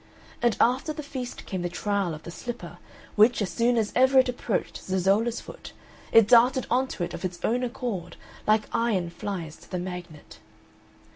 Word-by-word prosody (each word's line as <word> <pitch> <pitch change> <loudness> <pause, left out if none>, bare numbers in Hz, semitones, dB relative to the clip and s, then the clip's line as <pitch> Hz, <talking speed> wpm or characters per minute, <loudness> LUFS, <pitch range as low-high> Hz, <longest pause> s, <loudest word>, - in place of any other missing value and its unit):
And 240 -2 +2
after 260 +6 +2
the 300 - -6
feast 260 -3 -6
came 185 -2 -4
the 175 - -2
trial 195 -2 -1
of 155 - -12
the 170 - -8
slipper, 240 +6 -7 0.4
which, 220 +3 +5
as 205 -4 -1
soon 235 +1 +2
as 215 -2 +1
ever 260 +1 +5
it 260 -1 +6
approached 245 -3 -2
Zezolla's 195 +5 +1
foot, - - -11 0.4
it 225 -2 +7
darted 250 +3 +5
on 260 +2 +2
to 180 - -4
it 175 - -4
of 170 - -7
its 180 -1 -3
own 245 +3 +1
accord 230 -8 -4 0.3
like 215 0 +4
iron 200 -7 0
flies 170 -3 -5
to - - -18
the 185 - -3
magnet. 175 -4 -8
215 Hz, 185 wpm, -26 LUFS, 180-245 Hz, 0.4 s, it